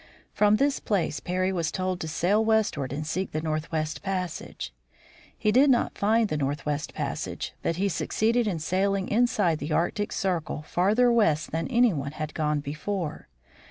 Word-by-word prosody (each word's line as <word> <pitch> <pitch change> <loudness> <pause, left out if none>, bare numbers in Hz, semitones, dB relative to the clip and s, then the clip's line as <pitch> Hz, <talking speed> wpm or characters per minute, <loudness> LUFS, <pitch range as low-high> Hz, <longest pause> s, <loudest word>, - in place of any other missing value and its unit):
From 210 0 +4
this 280 +4 +2
place 185 -7 -1
Parry 185 +1 -1
was 170 -4 -1
told 185 -1 -2
to 160 - -4
sail 185 +7 +2
westward 220 - +1
and 150 +2 -3
seek 185 +5 -3
the 155 - 0
northwest 155 0 -2
passage. 180 - -4 0.6
He 215 - +2
did 265 +6 +5
not 245 -2 +2
find 220 +2 +2
the 155 - -2
northwest 145 +1 -2
passage, - - -4
but 165 - 0
he 195 +4 +1
succeeded 225 +5 +1
in 185 -5 -1
sailing 190 +4 0
inside 225 -5 +3
of 155 - -2
the - - -1
Arctic 205 +6 0
circle 170 -5 -2
farther 210 +10 +3
west 160 -11 +2
than 165 +1 -1
any 245 -4 +4
one 140 -1 -4
had 155 0 -5
gone 150 -2 0
before. 155 +4 -4
180 Hz, 170 wpm, -27 LUFS, 155-210 Hz, 0.6 s, did